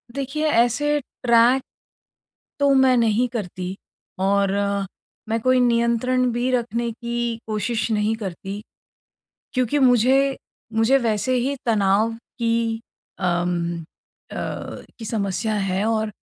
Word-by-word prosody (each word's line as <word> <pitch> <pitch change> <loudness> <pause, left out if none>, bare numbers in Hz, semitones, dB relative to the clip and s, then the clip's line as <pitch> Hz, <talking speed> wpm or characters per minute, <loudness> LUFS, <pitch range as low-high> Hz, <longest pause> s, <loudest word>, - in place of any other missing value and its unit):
देखिए, 280 +3 -2
ऐसे 290 +5 +2
ट्रैक 245 0 +3 1.0
तो 280 -1 +4
मैं 260 -1 +5
नहीं 230 +1 +2
करती 185 -4 -5 0.4
और 195 +1 +2 0.8
मैं 225 +1 0
कोई 255 +1 +3
नियंत्रण 240 +1 +2
भी 245 +2 0
रखने 235 -1 -1
की 235 0 -3
कोशिश 220 +2 -1
नहीं 215 +1 +1
करती, 195 0 -6 0.9
क्योंकि 255 +2 +1
मुझे 265 +2 +4 0.4
मुझे 225 +5 +4
वैसे 235 +1 0
ही 265 +3 0
तनाव 215 0 +2 0.3
की 230 -1 0 0.4
अम, 175 -1 -1 0.5
अ, - - -7 0.6
की 225 - -6
समस्या 215 0 -1
है 195 -1 0
और 220 -1 0
230 Hz, 110 wpm, -22 LUFS, 210-250 Hz, 1.0 s, मैं